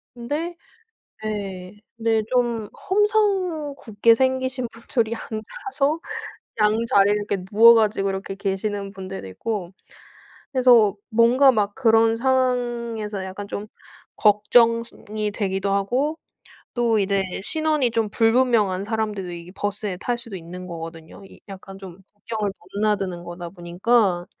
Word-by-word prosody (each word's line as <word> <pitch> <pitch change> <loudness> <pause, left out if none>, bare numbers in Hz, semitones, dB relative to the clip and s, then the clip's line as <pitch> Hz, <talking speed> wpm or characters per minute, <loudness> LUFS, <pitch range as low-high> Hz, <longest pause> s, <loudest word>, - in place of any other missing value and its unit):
근데 295 +9 -4 0.7
예. 200 -2 -5 0.2
네 225 -1 +1
좀 240 -4 0 0.2
험상궂게 360 - +2
생기신 260 0 0
분들이 230 0 -1
앉아서 295 - -3 0.6
양 210 0 +4
자리를 205 -1 +4
이렇게 205 -2 -3
누워 230 +3 +8
가지고 210 -3 +2
이렇게 195 0 -4
계시는 200 0 -3
분들도 190 - -7
있고 185 - -4 0.8
그래서 245 -6 +5
뭔가 245 +4 +5
막 205 -3 0
그런 225 -2 +4
상황에서 240 -5 -1
약간 190 +2 -7
좀 205 +1 -5 0.5
걱정스 230 +2 +3
이 210 -1 0
되기도 195 -1 -1
하고 250 +11 0 0.6
또 235 -3 +2
이제 195 0 +1 0.2
신원이 310 -2 +1
좀 225 -2 0
불분명한 225 -4 +2
사람들도 210 -4 -2
이게 170 +1 -9
버스에 205 -1 -3
탈 240 +5 -2
수도 230 -4 -8
있는 180 +1 -8
거거든요. 165 +1 -9
이 195 - -15
약간 195 0 -10
좀 190 -2 -11
국경을 210 0 -3 0.2
넘나드는 200 -4 0
거다 175 0 -7
보니까. 180 +1 +1
215 Hz, 270 characters per minute, -23 LUFS, 195-240 Hz, 0.8 s, 누워